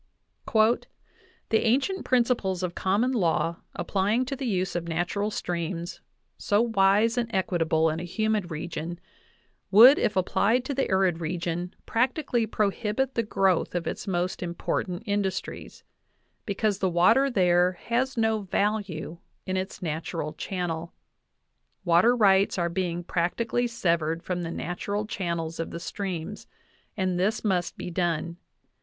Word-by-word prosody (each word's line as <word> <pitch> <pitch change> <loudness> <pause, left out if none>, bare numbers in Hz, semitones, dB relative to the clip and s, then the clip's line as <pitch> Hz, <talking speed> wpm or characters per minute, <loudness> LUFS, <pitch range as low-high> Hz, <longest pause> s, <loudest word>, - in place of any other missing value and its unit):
"The 220 0 0
ancient 275 - +1
principles 235 -7 +1
of 180 -1 -2
common 205 +9 +1
law 170 -6 +1 0.2
applying 205 +7 0
to 275 - -3
the 270 -1 -4
use 190 -4 -1
of 170 -1 -2
natural 175 +5 -1
streams, 175 -3 -4 0.4
so 205 - +2
wise 225 +1 +3
and 235 -1 -2
equitable 165 -5 +1
in 160 - -3
a - - -5
humid 210 +1 -1
region, 165 +1 -5 0.7
would, 240 +8 +9
if 210 - +1
applied 220 +6 +2
to 285 - -2
the 270 0 -1
arid 190 -3 +2
region, 175 +1 -3
practically 240 -1 0
prohibit 215 +5 -1
the 230 - +1
growth 195 -5 +1
of 175 - -1
its - - -4
most 180 -1 -1
important 175 +1 -3
industries," 200 -2 -3 0.6
because 205 0 0
the 190 - +1
water 225 +11 +4
there 180 -4 +3
"has 240 +8 -2
no 220 -1 +2
value 195 -4 -2 0.3
in 185 - -2
its 185 0 -4
nat 160 -1 -3
ural 155 -2 -3
channel.... 170 -2 -4 0.9
Water 175 +8 +5
rights 195 -4 +4
are 170 -1 0
being 175 -1 -2
practically 225 +8 0
sev 185 -8 +1
ered 160 +1 -3
from 180 -1 -2
the 165 - -4
natural 200 +5 -3
channels 170 -5 -3
of 165 - -3
the 170 - -6
streams; 185 +1 -5 0.5
and 185 -2 0
this 210 +5 0
must 185 -5 0
be 180 - -6
done. 170 -1 -1
190 Hz, 140 wpm, -26 LUFS, 175-220 Hz, 0.9 s, would